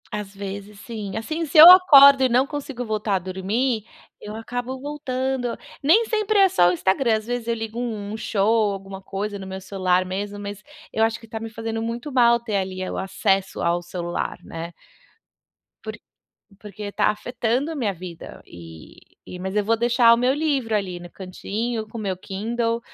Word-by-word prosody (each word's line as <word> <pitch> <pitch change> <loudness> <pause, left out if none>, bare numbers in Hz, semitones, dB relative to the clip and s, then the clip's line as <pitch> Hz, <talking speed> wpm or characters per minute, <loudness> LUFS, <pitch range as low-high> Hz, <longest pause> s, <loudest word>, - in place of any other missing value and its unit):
Às 205 -1 -5
vezes 200 +1 -7
sim 210 -5 -6
assim, 310 +10 -3
se 305 +1 -2
eu 320 +3 +13
acordo 280 -7 +8
e 260 - +3
não 250 +2 +3
consigo 280 -4 -6
voltar 215 -3 -1
a - - +1
dormir, 205 +6 -2 0.3
eu 210 +1 -8
acabo 245 +3 -5
voltando, 260 -3 -3 0.2
nem 335 +11 +5
sempre 430 -1 0
é 390 -1 +6
só 175 - +4
o 175 - +3
Instagram, 205 +7 +1
às 215 0 -4
vezes 245 -1 -3
eu 235 - +1
ligo 225 0 -5
um 230 -4 -3
um 220 - -5
show, 215 0 +1
alguma 195 0 -8
coisa 200 +2 -5
no 190 - -8
meu 190 0 -7
celular 185 -1 0
mesmo, 200 +2 -4
mas 205 0 -7 0.3
eu 220 - -2
acho 225 0 -2
que 225 - -15
tá 220 0 -6
me 225 0 -6
fazendo 225 0 -4
muito 235 +5 -4
mal 235 -2 +4
ter 220 -4 -2
ali, 185 -1 -3
eh, 185 - -4
o - - -5
acesso 195 0 -1
ao 170 +1 +1
celular, 175 0 -4
né. 165 +1 -7 1.1
Porq - - -7 0.6
porque 205 0 -8
tá - - +1
afetando 245 +6 -1
a - - -5
minha 225 -8 -1
vida, 175 -2 -10
eh 80 -2 -13 0.3
eh, 180 - -8
mas 190 +2 -5
eu 210 - +2
vou 230 +2 +3
deixar 235 0 +4
o - - +2
meu 250 +2 +2
livro 275 -7 0
ali 185 -4 -2
no 175 0 -10
cantinho 215 +5 -5
com 225 - -9
o - - -4
meu 195 -3 -2
Kindle, 230 +5 -2
220 Hz, 195 wpm, -23 LUFS, 195-245 Hz, 1.1 s, eu